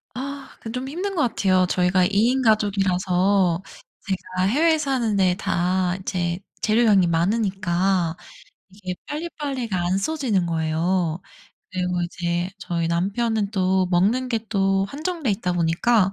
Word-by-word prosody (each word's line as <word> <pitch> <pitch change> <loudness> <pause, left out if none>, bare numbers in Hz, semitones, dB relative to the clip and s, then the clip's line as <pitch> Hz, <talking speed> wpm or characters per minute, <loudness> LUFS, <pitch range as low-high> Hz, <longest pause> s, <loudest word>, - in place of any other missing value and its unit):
아 275 +2 -6
그건 225 0 -8
좀 255 +1 -4
힘든 380 +6 -3
것 310 - +2
같아요. 185 -4 +2
저희가 180 +1 +2
2 - - +1 0.2
인 265 +1 +1
가족이라서 195 -3 +2 0.4
제가 185 -1 -3
해외에 315 +8 +3
사는데 225 -11 +1
다 180 -1 0
인제 175 -2 -2 0.2
재료 225 +2 +3
양이 195 -5 +5
많으니까 185 -1 +1 0.5
이게 185 -2 -6
빨리빨리가 280 - -3
안 185 +2 +1
써지는 230 - 0
거예요. 165 +1 0 0.5
그리고 180 -1 -1
이제 175 +1 -2
저희 170 -3 -2
남편은 200 +5 0
또 190 -2 +1
먹는 210 +9 +2
게 230 -2 0
또 195 -2 +1
한정돼 310 - -3
있다 190 -3 -1
보니까 180 +5 +2
195 Hz, 280 characters per minute, -23 LUFS, 180-230 Hz, 0.5 s, 양이